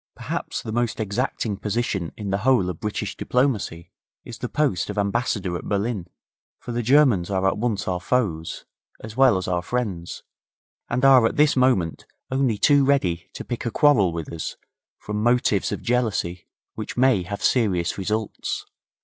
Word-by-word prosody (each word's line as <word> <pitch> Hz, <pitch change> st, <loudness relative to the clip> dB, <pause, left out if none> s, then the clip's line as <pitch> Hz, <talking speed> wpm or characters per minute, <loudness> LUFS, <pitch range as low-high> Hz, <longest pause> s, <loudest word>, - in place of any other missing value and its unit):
Perhaps -, -, -4 dB
the 110 Hz, -, -5 dB
most 120 Hz, 0 st, -1 dB
exacting 110 Hz, 0 st, -2 dB
position 105 Hz, -5 st, -2 dB
in 100 Hz, -2 st, -4 dB
the 100 Hz, -, 0 dB
whole 110 Hz, -6 st, +3 dB
of 80 Hz, -, -10 dB
British 105 Hz, -1 st, -3 dB
diplomacy 120 Hz, -10 st, -1 dB, 0.3 s
is -, -, -9 dB
the -, -, -4 dB
post 120 Hz, -, 0 dB
of 105 Hz, -, -5 dB
Ambassador 100 Hz, -3 st, 0 dB
at -, -, -5 dB
Berlin, 100 Hz, -2 st, -1 dB, 0.5 s
for 125 Hz, -, -8 dB
the 120 Hz, 0 st, -1 dB
Germans 125 Hz, -8 st, +4 dB
are 95 Hz, -1 st, +1 dB
at 95 Hz, -, 0 dB
once 110 Hz, -4 st, -1 dB
our 90 Hz, -1 st, -1 dB
foes, 95 Hz, -9 st, -1 dB, 0.4 s
as 110 Hz, 0 st, -8 dB
well 130 Hz, -6 st, +5 dB
as 95 Hz, -, -4 dB
our 90 Hz, -1 st, 0 dB
friends, 95 Hz, -6 st, -4 dB, 0.7 s
and 125 Hz, +3 st, +1 dB
are 130 Hz, -4 st, +7 dB
at -, -, -4 dB
this 150 Hz, 0 st, +4 dB
moment 125 Hz, -11 st, +1 dB, 0.2 s
only 130 Hz, -5 st, +1 dB
too 145 Hz, +5 st, +4 dB
ready 90 Hz, -12 st, +1 dB
to -, -, -7 dB
pick 120 Hz, -2 st, -4 dB
a 120 Hz, -, -1 dB
quarrel 115 Hz, -, +4 dB
with 85 Hz, -2 st, -5 dB
us 80 Hz, -, -5 dB, 0.4 s
from 105 Hz, 0 st, -4 dB
motives 120 Hz, -4 st, +2 dB
of -, -, -4 dB
jealousy 110 Hz, -8 st, -1 dB, 0.3 s
which 110 Hz, +1 st, -6 dB
may 130 Hz, -6 st, +4 dB
have 100 Hz, +3 st, -6 dB
serious 95 Hz, -8 st, +1 dB
results. 105 Hz, +2 st, -3 dB
105 Hz, 170 wpm, -23 LUFS, 95-125 Hz, 0.7 s, are